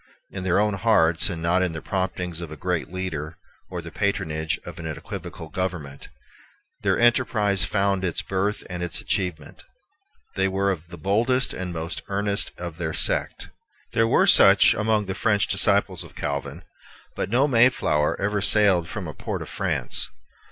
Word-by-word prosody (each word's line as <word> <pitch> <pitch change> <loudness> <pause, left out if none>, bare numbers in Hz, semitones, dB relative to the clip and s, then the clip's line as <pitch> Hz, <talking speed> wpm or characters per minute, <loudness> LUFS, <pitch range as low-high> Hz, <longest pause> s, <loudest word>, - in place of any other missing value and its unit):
In 95 - -6
their 90 +1 +2
own 105 0 +2
hearts, 95 -5 +2
and 85 -3 -5
not 90 +2 +2
in 90 -3 0
the 80 - -5
promptings 90 -3 -3
of 85 - -6
a 80 - -9
great 90 +1 -2
leader 85 -4 -5 0.3
or 90 -2 -6
the 85 - -9
patronage 80 -6 -2
of 85 0 -9
an 80 - -5
equivocal 80 +1 -7
government, 80 -6 -5 0.7
their - - +1
enterprise 115 -5 +2
found 100 -2 0
its 85 -3 -2
birth 95 +2 -2
and 90 -1 -6
its 90 -1 -2
achievement. 90 -6 -3 0.7
They 95 0 +1
were 100 +1 0
of 85 -3 -6
the 85 +1 -10
boldest 115 - +1
and 90 -1 -5
most 80 0 -5
earnest 100 0 0
of 85 -2 -7
their 80 -3 -3
sect. - - +2 0.4
There 115 0 +3
were - - +4
such - - +7
among 110 -1 0
the 95 - -3
French 105 +1 +1
disciples 100 -2 +3
of - - -15
Calvin; 70 +3 -4 0.5
but - - -3
no 130 +6 +3
Mayflower 115 - +2
ever 100 +1 -1
sailed 95 -5 +4
from 100 -5 -5
a 75 - -6
port - - -5
of - - -11
France. - - -2
95 Hz, 170 wpm, -24 LUFS, 85-100 Hz, 0.7 s, such